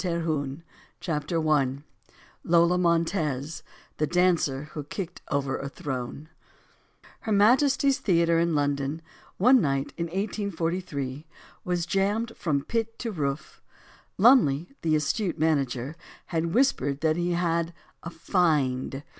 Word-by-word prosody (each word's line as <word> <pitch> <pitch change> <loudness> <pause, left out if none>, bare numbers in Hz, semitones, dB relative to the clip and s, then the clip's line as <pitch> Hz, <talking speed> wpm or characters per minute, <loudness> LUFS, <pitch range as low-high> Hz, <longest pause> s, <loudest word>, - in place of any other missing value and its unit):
250 165 -4 -2 0.4
CHAPTER 160 0 -2
ONE 145 -3 +1 0.6
LOLA 170 +1 +3
MONTEZ 165 -4 0 0.4
THE 155 - 0
DANCER 170 -6 +2
WHO 150 -2 -5
KICKED 175 +2 -6
OVER 140 -2 -1
A 140 - -5
THRONE 140 -2 -5 0.9
HER 220 - -5
MAJESTY'S 265 +6 +4
Theatre 170 -3 +2
in 170 -1 +1
London, 145 +2 -1 0.3
one 250 +5 +6
ni 135 -2 +1
Ki - - -13
in 170 0 -2
1 165 - -14
843, 170 -8 -3 0.4
was 175 -1 -1
jammed 205 +5 0
from 145 -5 -1
pit 225 +2 -2
to 230 - -4
roof. 145 -5 -4 0.6
Lumley 185 - +5
the 160 -2 +2
astute 165 +5 -1
manager, 140 -3 0 0.3
had 165 0 -2
whispered 145 - +1
that 155 0 +2
he 175 +1 0
had 170 -1 0 0.3
a 170 - -6
"find." 150 -6 0
165 Hz, 125 wpm, -26 LUFS, 145-180 Hz, 0.9 s, one